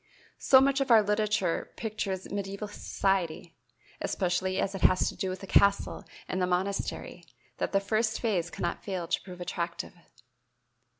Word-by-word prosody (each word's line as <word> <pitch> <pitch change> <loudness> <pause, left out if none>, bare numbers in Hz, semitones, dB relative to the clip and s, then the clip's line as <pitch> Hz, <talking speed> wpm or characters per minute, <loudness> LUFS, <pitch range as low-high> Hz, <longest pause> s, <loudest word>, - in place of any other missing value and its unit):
So 260 - +7
much 275 0 +3
of 270 - 0
our 225 -3 +7
literature 210 -3 0
pictures 205 -4 -3
medieval 200 +1 -4
society, 190 -5 -1 0.5
especially 185 0 0
as 195 - 0
it 195 - -5
has 185 - +4
to - - -8
do 190 - -2
with 185 +1 -5
the - - -6
castle 200 +1 +3 0.2
and 185 - -2
the 180 - +2
monastery, 185 +2 -2 0.4
that - - -1
the 195 - +3
first 220 +2 0
phase 185 -8 0
cannot 175 - -3
fail 185 -4 -3
to - - 0
prove 180 -2 -10
attractive. 170 -1 -4
195 Hz, 160 wpm, -29 LUFS, 180-210 Hz, 0.5 s, So